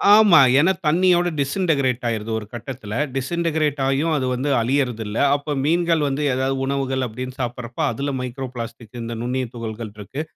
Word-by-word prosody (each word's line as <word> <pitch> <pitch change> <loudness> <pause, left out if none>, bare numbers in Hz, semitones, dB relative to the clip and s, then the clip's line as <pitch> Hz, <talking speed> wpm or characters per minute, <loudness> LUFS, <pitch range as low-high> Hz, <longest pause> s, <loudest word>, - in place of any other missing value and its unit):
ஆமா. 210 -7 +7 0.2
ஏன்னா 170 +6 +4 0.2
தண்ணியோட 175 +2 +4
டிஸ்இன்டக்கிரேட் 140 -5 +1
ஆயிருது. 110 -1 -3
ஒரு 105 - -9
கட்டத்துல 120 -3 -6 0.2
டிஸ்இன்டக்கிரேட் 155 +1 0
ஆயும் 145 +4 +1
அது 130 - -1
வந்து 130 +4 -1
அழியறது 125 -2 0
இல்ல. 105 +2 -4 0.2
அப்போ 145 +1 -4
மீன்கள் 165 -1 +2
வந்து 140 +2 -1
ஏதாவது 130 +1 0
உணவுகள் 135 -1 -1
அப்படினு 125 +3 -7
சாப்பிடறப்போ 120 -1 -4
அதுல 140 +4 -3
மைக்ரோ 125 +1 -4
பிளாஸ்டிக்ஸ் 115 0 -7
இந்த 115 0 -5
நுண்ணிய 125 +1 -1
துகள்கள் 110 -2 -6
இருக்கு. 105 +8 -6
130 Hz, 155 wpm, -22 LUFS, 120-150 Hz, 0.2 s, ஆமா